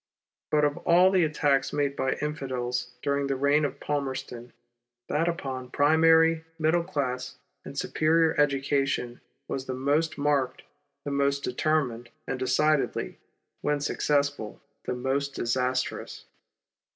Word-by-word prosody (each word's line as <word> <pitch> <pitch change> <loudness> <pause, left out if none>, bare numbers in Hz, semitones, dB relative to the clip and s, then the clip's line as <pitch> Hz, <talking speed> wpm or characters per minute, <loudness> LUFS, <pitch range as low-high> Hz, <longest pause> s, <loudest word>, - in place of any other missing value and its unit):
But 150 -1 +3
of 145 0 0
all 180 +2 +4
the 185 -2 +4
attacks 145 -3 +1
made 140 -1 0
by 130 - 0
Infidels 130 -4 -3 0.2
during 140 0 0
the 135 - 0
reign 140 +3 +2
of 140 -1 -2
Palmerston, 130 -4 -4 0.6
that 165 +3 +1
upon 130 -7 -3
primary, 160 +3 +4
middle 165 +2 +2
class, 130 -7 -3 0.3
and 140 - -9
superior 160 +1 +2
education 135 -3 0 0.3
was 135 -1 -4
the 130 - -3
most 145 +4 0
marked, 140 -3 0 0.4
the 145 - -3
most 140 0 +1
determined, 125 -3 -1 0.2
and 130 - -3
decidedly, 145 +3 +1 0.4
when 150 0 0
successful, 140 -5 -1 0.3
the 125 - -2
most 135 +3 -2
disastrous. 125 +2 -2
140 Hz, 125 wpm, -27 LUFS, 130-150 Hz, 0.6 s, all